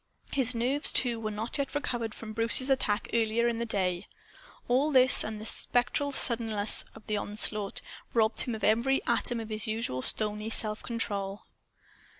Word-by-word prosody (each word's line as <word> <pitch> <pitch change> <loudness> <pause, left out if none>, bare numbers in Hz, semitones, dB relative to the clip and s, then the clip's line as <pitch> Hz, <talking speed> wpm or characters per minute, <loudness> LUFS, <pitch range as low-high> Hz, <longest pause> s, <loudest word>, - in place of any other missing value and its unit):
His 255 -3 +2
nerves, 255 +5 +1
too, 240 -3 +2
were 215 -1 -3
not 215 +6 -5
yet 280 - -3
recovered 240 -6 -2
from 220 -1 -9
Bruce's 230 +4 +3
attack 220 -5 0
earlier 230 +1 +1
in 235 -1 -2
the 235 - -3
day. 185 -3 -1 0.6
All 260 +5 +2
this, 260 -3 +6
and 215 0 -5
the 215 - -8
spectral 250 +5 +1
suddenness 225 -5 0
of - - -14
the 215 - -2
onslaught, 205 0 -1 0.3
robbed 220 -1 +1
him 240 - -3
of 220 - -9
every 235 +6 +1
atom 240 -1 0
of 225 -1 -7
his 215 0 -2
usual 215 - -3
stony 210 +6 +3
self 215 -1 -1
control. 200 -4 -3
225 Hz, 165 wpm, -28 LUFS, 215-245 Hz, 0.6 s, this